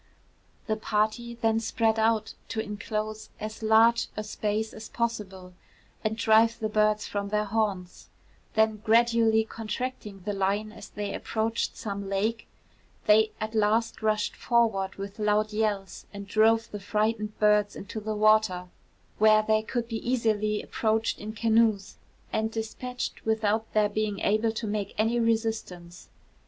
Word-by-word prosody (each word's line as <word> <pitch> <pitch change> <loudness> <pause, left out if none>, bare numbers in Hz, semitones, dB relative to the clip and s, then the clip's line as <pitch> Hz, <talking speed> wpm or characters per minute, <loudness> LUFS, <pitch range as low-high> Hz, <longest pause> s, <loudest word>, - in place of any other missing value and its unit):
The 215 -1 -1
party 220 +2 -1
then 225 -1 +1
spread 225 0 +1
out 220 0 +1
to 225 - -4
inclose 215 0 -4
as 215 +1 -6
large 225 +2 +4
a 215 - -2
space 215 +1 -2
as 220 - -9
possible, 195 -6 -4 0.5
and 220 0 -1
drive 225 +1 +4
the 215 - -2
birds 215 0 +2
from 200 -1 -3
their 210 +1 +1
haunts; 200 -4 -2 0.5
then 220 0 +3
gradually 225 0 +3
contracting 220 -2 -5
the 205 - -1
line 200 +2 0
as - - -11
they 205 -1 -4
approached 225 +1 -2
some 200 -2 -5
lake, 215 +4 -1 0.6
they 215 +1 +5
at 215 +1 -4
last 220 +2 +1
rushed 215 -1 0
forward 220 -6 +1
with 200 +2 -7
loud 210 0 +1
yells, 210 -3 -2
and 200 -1 -8
drove 225 +2 +3
the 205 - -5
frightened 215 +1 -1
birds 210 -1 +3
into 200 +3 -6
the 215 0 -3
water, 210 -4 +3 0.5
where 215 0 +6
they 215 0 +2
could 235 +1 -3
be 225 -1 -3
easily 215 -4 0
approached 220 0 0
in 210 +1 -6
canoes 220 -2 +2 0.4
and 220 0 0
despatched 225 +3 -5
without 220 0 0
their 215 -1 +4
being 210 -1 -2
able 215 +2 +2
to 225 +1 -4
make 205 -1 -3
any 225 +3 +2
resistance. 220 -7 -2
215 Hz, 145 wpm, -27 LUFS, 210-225 Hz, 0.6 s, where